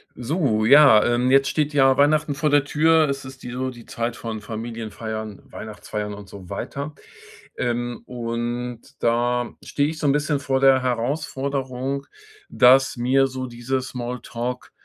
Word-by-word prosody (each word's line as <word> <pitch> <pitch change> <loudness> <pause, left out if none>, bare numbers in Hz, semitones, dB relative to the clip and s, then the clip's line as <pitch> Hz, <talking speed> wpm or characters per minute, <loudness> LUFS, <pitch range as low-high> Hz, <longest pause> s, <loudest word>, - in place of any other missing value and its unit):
So, 125 -4 0
ja, 135 -4 +7
ähm, 120 +2 +2
jetzt 135 0 +5
steht 150 -1 0
ja 135 -2 +5
Weihnachten 145 +1 +2
vor 150 +2 +1
der 145 -1 +3
Tür. 160 +1 +3
Es 140 0 -3
ist 130 0 -11
die 125 - -6
so 130 +1 -2
die 120 -2 -11
Zeit 120 -2 -3
von 110 -2 -5
Familienfeiern, 110 -1 -6
Weihnachtsfeiern 105 -1 -6
und 100 -1 -10
so 95 -2 -12
weiter. 145 +2 -5 0.6
Ähm, 120 0 -2
und 120 0 -4 0.2
da 120 +1 +1
stehe 145 +1 0
ich 155 0 -6
so 150 - 0
'n 140 - +4
bisschen 150 0 0
vor 135 -1 -1
der 135 -1 +5
Herausforderung, 135 +1 -2 0.4
dass 130 +2 +5
mir 130 +2 +2
so 130 0 -5
diese 120 +2 -2
Small 125 -1 -5
Talk 125 +2 -5
125 Hz, 160 wpm, -23 LUFS, 120-140 Hz, 0.6 s, ja